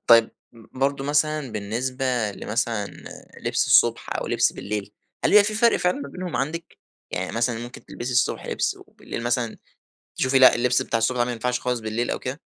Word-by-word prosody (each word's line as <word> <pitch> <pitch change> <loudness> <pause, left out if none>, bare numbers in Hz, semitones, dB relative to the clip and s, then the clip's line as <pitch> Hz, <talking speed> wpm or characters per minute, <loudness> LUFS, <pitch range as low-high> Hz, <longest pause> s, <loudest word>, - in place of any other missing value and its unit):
طيب 115 -1 +7 0.2
برضه 135 +4 -3
مثلًا 150 -2 0
بالنسبة 120 +2 -1
لمثلًا 115 0 -2 0.5
لبس - - 0
الصبح - - +3
أو - - -3
لبس - - +2
بالليل 105 0 -5 0.3
هل - - +4
بيبقي 210 -1 +7
في 215 +1 -2
فرق 235 +1 +4
فعلًا 180 -3 0
ما 140 - -6
بينهم 180 +3 -5
عندِك؟ 160 +5 -4 0.3
يعني 90 0 -3
مثلًا 120 0 0
ممكن 120 +2 -9
تلبسي 125 +2 -5
الصبح 125 - +1
لبس - - -1
وبالليل 115 - -7
مثلًا 120 -1 -1 0.6
تشوفي 130 +1 +3
لأ، 130 - +8
اللبس 125 +1 +2
بتاع 115 - -1
الصبح 115 +3 +1
ده 120 - +3
لا - - 0
ما 125 - -2
ينفعش 125 +1 -1
خالص 125 -1 -1
بالليل 110 +2 -2
أو - - -1
كده؟ 130 +4 -5
125 Hz, 185 wpm, -24 LUFS, 115-140 Hz, 0.6 s, لأ